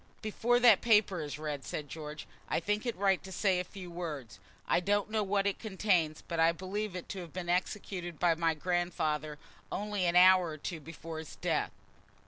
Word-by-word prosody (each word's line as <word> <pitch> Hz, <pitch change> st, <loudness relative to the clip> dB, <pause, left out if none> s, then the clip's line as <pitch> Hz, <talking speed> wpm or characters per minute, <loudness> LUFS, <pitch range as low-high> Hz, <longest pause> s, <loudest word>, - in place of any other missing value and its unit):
"Before 235 Hz, +3 st, +2 dB
that 235 Hz, -5 st, +7 dB
paper 210 Hz, -6 st, +3 dB
is 150 Hz, -1 st, -5 dB
read," 150 Hz, -2 st, -4 dB
said 150 Hz, -, -5 dB
George, 150 Hz, +1 st, -7 dB, 0.2 s
"I -, -, +1 dB
think 210 Hz, +7 st, -1 dB
it 235 Hz, -, -1 dB
right 195 Hz, -1 st, +2 dB
to 190 Hz, -, -9 dB
say 190 Hz, -1 st, +2 dB
a -, -, -1 dB
few 180 Hz, -1 st, -10 dB
words. 150 Hz, -, -6 dB, 0.3 s
I -, -, +3 dB
don't 205 Hz, +3 st, 0 dB
know 215 Hz, -1 st, +1 dB
what 200 Hz, 0 st, +1 dB
it 200 Hz, -2 st, 0 dB
contains, 190 Hz, -7 st, 0 dB
but 170 Hz, -1 st, -3 dB
I 165 Hz, +1 st, +5 dB
believe 190 Hz, +3 st, -4 dB
it 180 Hz, -, -6 dB
to 195 Hz, -, -4 dB
have 170 Hz, -3 st, -9 dB
been 180 Hz, -1 st, -5 dB
executed 180 Hz, -2 st, -2 dB
by 175 Hz, -2 st, +4 dB
my 165 Hz, 0 st, +1 dB
grandfather 155 Hz, -3 st, -1 dB, 0.3 s
only 205 Hz, -2 st, -1 dB
an 170 Hz, -, +1 dB
hour 185 Hz, 0 st, +7 dB
or 155 Hz, -1 st, -5 dB
two 160 Hz, +2 st, -5 dB
before 165 Hz, +1 st, -8 dB
his 160 Hz, -, -9 dB
death." -, -, 0 dB
180 Hz, 200 wpm, -32 LUFS, 160-200 Hz, 0.3 s, that